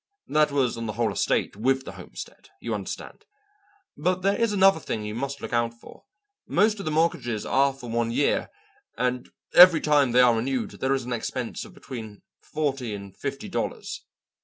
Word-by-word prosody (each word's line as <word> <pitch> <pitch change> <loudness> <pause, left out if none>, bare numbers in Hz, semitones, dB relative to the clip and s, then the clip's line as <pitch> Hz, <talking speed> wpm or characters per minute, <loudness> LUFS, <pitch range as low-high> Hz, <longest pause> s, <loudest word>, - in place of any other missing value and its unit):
That 150 0 +3
was 135 -5 +1
on 115 - -4
the 105 - -3
whole 115 +1 0
estate - - 0
with 130 +5 +1
the - - -6
homestead, - - -10
you - - -4
understand? - - -6 0.7
But 180 +4 0
there 200 +1 +3
is 230 -2 +1
another 195 -3 +5
thing 110 -8 -4
you 105 - -4
must 140 +4 -4
look - - -6
out 115 0 +1
for. 115 - -15 0.4
Most 210 +3 +2
of 195 - -6
the 155 - -1
mortgages 135 -9 0
are 140 +1 +3
for 135 -2 -11
one 115 0 0
year, 135 +5 +1 0.5
and 125 0 -1 0.2
every 175 -2 +9
time 145 -4 +3
they 125 +1 +6
are 120 -2 +5
renewed 125 +1 -1
there 135 +1 0
is 130 - -3
an 125 - -3
expense 115 - -4
of - - -15
between 110 -6 -9 0.2
forty 135 -7 -2
and 100 -1 -10
fifty - - -5
dollars." - - -4
130 Hz, 185 wpm, -25 LUFS, 115-150 Hz, 0.7 s, every